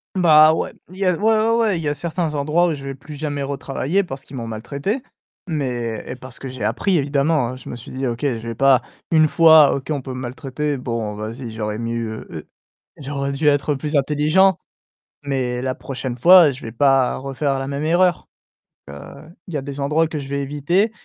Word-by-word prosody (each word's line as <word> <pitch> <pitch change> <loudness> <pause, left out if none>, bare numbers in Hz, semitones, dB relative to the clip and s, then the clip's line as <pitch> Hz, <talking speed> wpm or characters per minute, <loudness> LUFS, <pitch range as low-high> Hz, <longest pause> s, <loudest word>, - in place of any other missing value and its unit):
Bah, 155 -3 +6
ouais, - - -2 0.2
il 185 - -13
y 195 - -1
a 180 - +4
ouais, - - -7
ouais, 220 0 +3
ouais, 215 -6 +1
il - - -6
y 150 - -2
a 145 - +1
certains 160 +1 -3
endroits 155 +5 +2
où 160 - -1
je 140 - -10
vais 135 -1 -5
plus 145 +2 -11
jamais 145 -1 -3
retravailler 140 +6 -1
parce 135 -5 -8
qu'ils 140 - -11
m'ont 115 -2 -5
maltraité, 140 - -3 0.5
mais 125 - -3
et - - -6
parce 130 -2 -11
que 135 - -7
j'ai 125 -4 -5
appris 170 - +1
évidemment, 140 -3 +1
je 130 - -11
me 120 - -6
suis 110 - -11
dit: 130 +1 -3
«OK, 120 0 -3
je - - +3
vais 115 +1 -5
pas 135 0 +4 0.3
1 155 -2 +5
fois 160 -3 +7
OK 135 - -5
on 145 -3 -1
peut 130 0 -7
maltraiter, 130 +3 -4
bon 115 -4 -3
vas-y 115 +4 -6
j'aurais 105 -1 -4
mieux, 115 -1 -4
heu - - -10
heu, - - -12 0.5
j'aurais 140 -1 -3
dû 150 +2 -1
être 145 0 +3
plus 150 +2 -4
intelligent, 155 +6 +3 0.7
mais 130 -3 -2
la 130 -1 -1
prochaine 130 -2 -6
fois 175 +2 +8
je 135 0 -8
vais 115 - -7
pas 135 +1 +3
refaire 135 +1 -2
la 135 - -3
même 140 +2 -3
erreur». 175 +1 +2 0.6
Heu, 70 - -9 0.5
il 175 - -9
y - - 0
a - - -4
des 140 +1 -7
endroits 155 +3 +1
que 155 - -4
je 140 - -7
vais 140 0 -2
éviter 150 +10 0
140 Hz, 215 wpm, -20 LUFS, 130-155 Hz, 0.7 s, fois